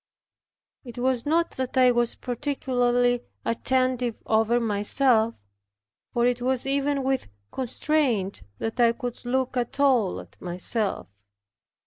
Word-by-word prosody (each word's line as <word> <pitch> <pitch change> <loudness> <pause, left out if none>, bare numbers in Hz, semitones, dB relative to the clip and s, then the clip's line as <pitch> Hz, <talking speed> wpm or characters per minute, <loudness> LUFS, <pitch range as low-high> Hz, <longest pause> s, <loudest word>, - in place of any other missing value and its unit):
It 240 -3 -10
was 250 0 0
not 335 +2 +2
that 260 0 -3
I 255 -1 +6
was 240 -1 +1
particularly 245 -2 0 0.2
attentive 255 0 0
over 225 +2 +2
myself, 225 +2 +2 0.8
for 240 0 +1
it 245 0 +1
was 255 0 0
even 280 0 +1
with 265 0 0 0.2
constraint 255 - 0 0.2
that 225 +2 -4
I 235 -1 +5
could 245 -1 -6
look 260 +1 0
at 245 +3 -2
all 250 -9 +3
at - - -14
myself. 185 +4 -2
245 Hz, 120 wpm, -25 LUFS, 230-260 Hz, 0.8 s, I